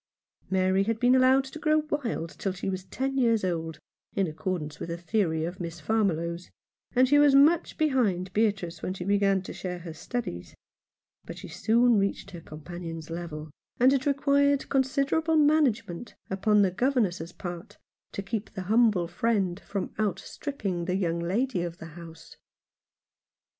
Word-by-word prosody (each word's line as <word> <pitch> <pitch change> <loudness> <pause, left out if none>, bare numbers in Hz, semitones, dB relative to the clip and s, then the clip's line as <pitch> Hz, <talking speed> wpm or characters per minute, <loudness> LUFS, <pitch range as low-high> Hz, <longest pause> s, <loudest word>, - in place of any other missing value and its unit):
Mary 190 0 +2
had 225 0 -1
been 245 +1 +4
allowed 260 +1 +5
to 270 +4 -9
grow 310 0 +3
wild 230 - -2
till 195 - -1
she 190 +1 -3
was 185 0 -5
ten 270 +8 -2
years 230 -4 +3
old, 165 -3 -2 0.4
in 195 - +2
accordance 155 -2 -4
with - - -5
a 170 - -3
theory 170 -3 0
of 175 +3 -6
Miss 170 -1 -5
Farmiloe's, 170 -3 -1 0.5
and 255 +1 +5
she 290 +2 +5
was 290 -2 +6
much 310 +5 +4
behind 210 - +1
Beatrice 200 -6 0
when 185 - -3
she 185 - -5
began 195 -1 +2
to - - -7
share 180 -1 -5
her 170 -2 -8
studies; 160 - -5 0.7
but - - -9
she - - -8
soon 235 0 +3
reached 195 0 -2
her 175 -3 -9
companion's 165 +1 -8
level, 160 -3 -6 0.3
and 255 +2 +6
it 275 +1 0
required 280 0 +2
con 270 - +4
siderable 295 +5 +1
management 265 - +1 0.2
upon 205 +2 +3
the 190 - +2
governess's 185 - 0
part 175 -1 -8 0.4
to 200 - -4
keep 220 +1 -4
the 190 - -4
humble 210 -3 +3
friend 190 0 0
from 200 -1 -5
outstripping 200 - -3
the 180 0 -1
young 170 -3 0
lady 195 +4 0
of 170 -1 -4
the 165 - -9
house. 165 -1 -12
195 Hz, 165 wpm, -27 LUFS, 175-250 Hz, 0.7 s, was